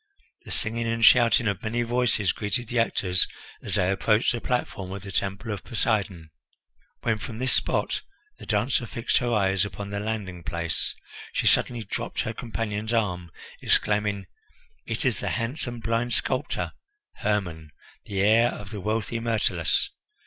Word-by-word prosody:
The - - -10
singing 115 +1 -1
and 115 0 +3
shouting 115 -1 +6
of 100 0 -1
many 120 +1 0
voices 120 -5 +2
greeted 115 +3 -2
the 120 - +1
actors 90 -5 +2 0.3
as - - 0
they 90 +1 +3
approached 105 +3 +3
the 120 - -3
platform 100 -6 -2
of 100 -1 -6
the 100 - -7
Temple 100 +4 -2
of 100 -3 -4
Poseidon. 100 -9 -1 0.7
When 110 -2 +1
from 110 +1 -6
this 130 +2 +1
spot - - +1 0.4
the - - -10
dancer 115 +3 +1
fixed 115 +1 +1
her 120 -1 -1
eyes 95 -3 +3
upon 100 +1 -5
the 100 - -2
landing 105 -4 -3
place, 85 -1 -2 0.4
she - - 0
suddenly 120 -2 +3
dropped 100 - -3
her 110 - -3
companion's 110 -1 -3
arm, 90 -6 0 0.3
exclaiming: 105 -1 +2 0.6
"It - - -2
is - - +2
the - - -1
handsome 120 0 -3
blind 115 +1 0
sculptor, - - 0 0.5
Hermon, 90 -7 -1 0.4
the 100 -1 -1
heir 115 +3 +5
of 100 -2 -8
the 105 - -5
wealthy 110 +3 -1
Myrtilus. 110 -8 +1
105 Hz, 155 wpm, -26 LUFS, 100-115 Hz, 0.7 s, shouting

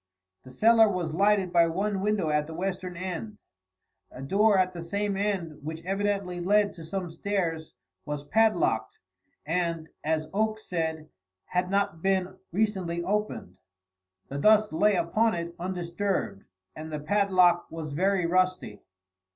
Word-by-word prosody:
The 130 - -14
cellar 220 - +5
was 175 -5 -2
lighted 195 0 +2
by 170 -1 +5
one 195 +4 -1
window 200 -6 0
at 150 0 +1
the 160 - -8
western 180 0 -4
end. 185 +4 -5 0.7
A 130 - -9
door 200 +7 +3
at 185 0 +2
the 170 - -6
same 200 +4 -2
end, 190 -6 -2
which 160 +2 -6
evidently 195 -2 -1
led 205 +3 +2
to 165 - -11
some 180 +1 -4
stairs, 165 -3 -3 0.3
was 150 -1 -4
padlocked, 175 - +1 0.5
and, 165 0 -1
as 155 0 0
Oakes 215 +1 -1
said, 160 -3 -3 0.4
had 180 0 -1
not 200 -4 0
been 190 0 0 0.2
recently 185 -4 -1
opened. 195 - -2 0.7
The 140 - -5
dust 215 +2 +4
lay 205 +5 +3
upon 185 +5 +1
it 170 0 -4
undisturbed 180 - -3 0.3
and 155 +1 -8
the 150 - -3
padlock 180 0 +3
was 160 -2 -6
very 185 +4 +1
rusty. 185 - 0
180 Hz, 145 wpm, -27 LUFS, 165-200 Hz, 0.7 s, cellar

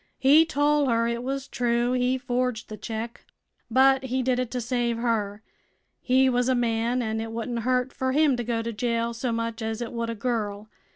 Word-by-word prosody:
He 295 +5 +6
tol' 290 -1 +2
her 230 -1 +2
it 235 0 -2
was 270 +1 -3
true 240 0 0
he 250 +1 +1
forged 250 -2 -2
th' 215 - -8
check, 225 +1 -5 0.5
but 265 0 +4
he 260 0 -1
did 250 0 +1
it 250 -2 -1
to 250 - -3
save 240 -1 -1
her. 220 -3 -1 0.6
He 260 +1 +3
was 245 0 +1
a 260 - +3
man 235 +1 0
an' 220 0 -2
it 225 0 -5
wouldn't 235 +1 -3
hurt 250 +2 0
fer 260 0 -1
him 295 -1 +3
to 240 - -2
go 230 -1 -1
to 230 0 -4
jail 235 +1 -1
so 235 +1 -2
much 230 0 -3
as 220 0 -3
it 240 -1 -5
would 230 -1 -2
a 230 - -3
girl. 215 -2 -3
240 Hz, 210 wpm, -26 LUFS, 230-255 Hz, 0.6 s, He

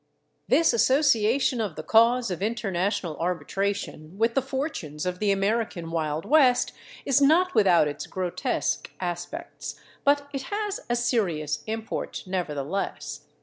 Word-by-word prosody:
This 330 -4 +4
association 255 -1 +3
of 200 -7 -3
the 155 - -6
cause 230 +1 +4
of 180 - -4
international 200 -5 -1
arbitration 180 0 -3
with 230 +2 +2
the 270 - +2
fortunes 265 - -4
of 180 0 -2
the 210 -1 +2
American 195 -4 -1
Wild 155 -1 -2
West 265 -5 +4 0.3
is 275 0 +3
not 345 +6 +4
without 180 -7 +5
its 145 - -5
grotesque 185 -2 -2
aspects. 180 - -5 0.2
But 285 0 +3
it 275 - -2
has 415 -1 -2
a 240 - +2
serious 180 - 0
import, 220 0 -4
nevertheless. 180 -1 -3
210 Hz, 130 wpm, -26 LUFS, 175-255 Hz, 0.3 s, without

